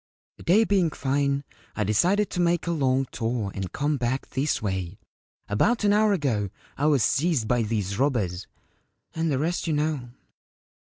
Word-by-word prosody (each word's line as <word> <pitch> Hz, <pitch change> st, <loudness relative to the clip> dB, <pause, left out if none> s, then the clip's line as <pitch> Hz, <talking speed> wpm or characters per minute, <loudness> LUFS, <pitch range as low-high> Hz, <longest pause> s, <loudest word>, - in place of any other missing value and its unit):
The -, -, -14 dB
day 200 Hz, +6 st, +5 dB
being 195 Hz, -6 st, +2 dB
fine, 140 Hz, 0 st, 0 dB, 0.3 s
I 105 Hz, -, 0 dB
decided 180 Hz, -, +2 dB
to 180 Hz, -, -3 dB
make 175 Hz, -1 st, +2 dB
a 170 Hz, -, -1 dB
long 135 Hz, -4 st, +1 dB
tour 115 Hz, -3 st, -2 dB
and 95 Hz, -2 st, -5 dB
come 145 Hz, +1 st, 0 dB
back 125 Hz, +1 st, -2 dB
this 140 Hz, +2 st, 0 dB
way. 95 Hz, -5 st, -3 dB, 0.5 s
About 215 Hz, -, +1 dB
an 205 Hz, -1 st, +4 dB
hour 215 Hz, 0 st, +4 dB
ago 125 Hz, -, 0 dB, 0.3 s
I 145 Hz, -, +1 dB
was 140 Hz, -6 st, +3 dB
seized 145 Hz, -6 st, +1 dB
by 120 Hz, 0 st, +2 dB
these 105 Hz, -2 st, -2 dB
robbers; 105 Hz, -10 st, 0 dB, 0.7 s
and 165 Hz, 0 st, -1 dB
the 135 Hz, -, +1 dB
rest 170 Hz, +5 st, -1 dB
you 160 Hz, -, +1 dB
know. 150 Hz, -4 st, -1 dB
140 Hz, 170 wpm, -25 LUFS, 115-165 Hz, 0.7 s, day